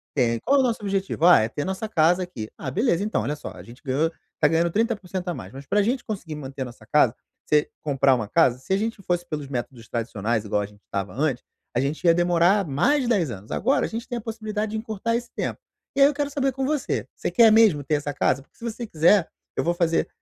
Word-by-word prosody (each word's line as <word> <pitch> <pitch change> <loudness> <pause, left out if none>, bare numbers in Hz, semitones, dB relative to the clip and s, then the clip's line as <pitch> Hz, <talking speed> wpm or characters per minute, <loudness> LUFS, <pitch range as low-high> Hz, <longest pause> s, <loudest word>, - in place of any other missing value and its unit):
"Tem." 120 -4 +2
"E - - -4
qual 280 +3 +3
é - - +5
o - - +4
nosso 235 -3 0
objetivo?" 195 -4 -1
"Ah, 175 -7 +8
é 110 - 0
ter 145 - -4
nossa 190 +3 -3
casa 175 0 +3
aqui." 115 -12 -7
"Ah, - - -5
beleza, 200 -4 +1
então, 215 - 0
olha 150 - -2
só, 150 - -8
a - - -11
gente 115 +5 -14
ganhou 145 +5 +1 0.3
tá 150 - +5
ganhando 165 +2 +2
30% 200 -4 -1
a - - -1
mais, 95 - -8
mas 135 +2 -10
pra 205 +8 +2
gente 245 +5 0
conseguir 180 -8 -5
manter 135 -2 -7
a - - 0
nossa 120 -3 -12
casa, 130 -1 +3 0.3
você 150 -1 +2
comprar 140 -2 +3
uma 115 -4 -3
casa, 130 -1 +3
se 130 - -10
a - - +3
gente 220 0 -3
fosse 175 -2 -1
pelos 150 -4 -4
métodos 120 -3 -5
tradicionais 115 -1 -2
igual 105 0 0
a - - -2
gente 105 0 -20
estava 100 -1 -4
antes, 135 -1 -1 0.3
a - - +3
gente 140 +4 -2
ia 170 - +7
demorar 175 +3 +3
mais 275 - +2
de 240 - -1
10 180 - +2
anos, 100 +1 -9
agora 260 +7 +1
a - - -4
gente 230 +2 -5
tem 245 - -3
a - - -5
possibilidade 220 -1 -4
de - - -1
encurtar 220 +1 -2
esse 240 0 -3
tempo. - - -3 0.4
E 275 - +2
aí 275 - +9
eu 295 - 0
quero 285 0 -2
saber 275 -1 0
com 265 +1 -2
você, 300 -2 -1
você - - -3
quer 230 -3 +6
mesmo 215 -10 +5
ter 150 +3 0
essa 145 0 -3
casa? 135 -1 +1
Porque - - -37
se - - -15
você 235 0 -4
quiser, 170 +2 +4 0.3
eu - - 0
vou 170 - +1
fazer 170 -1 +1
170 Hz, 260 wpm, -24 LUFS, 135-220 Hz, 0.4 s, aí